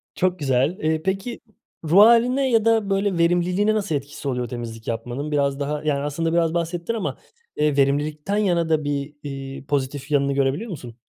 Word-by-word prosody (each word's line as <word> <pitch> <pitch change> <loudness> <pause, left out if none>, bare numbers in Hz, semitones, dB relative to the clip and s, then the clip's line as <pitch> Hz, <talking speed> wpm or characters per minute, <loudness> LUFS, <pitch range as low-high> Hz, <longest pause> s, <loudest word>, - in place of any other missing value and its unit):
Çok 185 -1 0
güzel, 135 +4 +1
ııı, 155 0 +1
peki, 195 +5 -2 0.4
ruh 165 +5 +4
hâline 245 +4 +5
ya 225 -2 +3
da 225 -3 +3
böyle 195 -1 +1
verimliliğine 175 +5 +2
nasıl 200 -7 -1
etkisi 140 0 -5
oluyor 125 -2 -1
temizlik 115 -2 -7
yapmanın? 120 +6 -4
Biraz 140 -1 +1
daha 145 +1 -2
yani 150 -2 +1
aslında 160 +3 -2
biraz 165 -1 +2
bahsettin 170 +4 -2
ama, 225 -4 -3 0.4
ııı, 150 -2 +2
verimlilikten 150 +7 +1
yana 175 -5 +1
da 155 -1 +2
bir, 145 0 -3 0.5
ııı, - - -16
pozitif 140 0 -2
yanını 140 -1 +2
görebiliyor 140 - 0
musun? 125 -9 -8
155 Hz, 175 wpm, -23 LUFS, 140-190 Hz, 0.5 s, hâline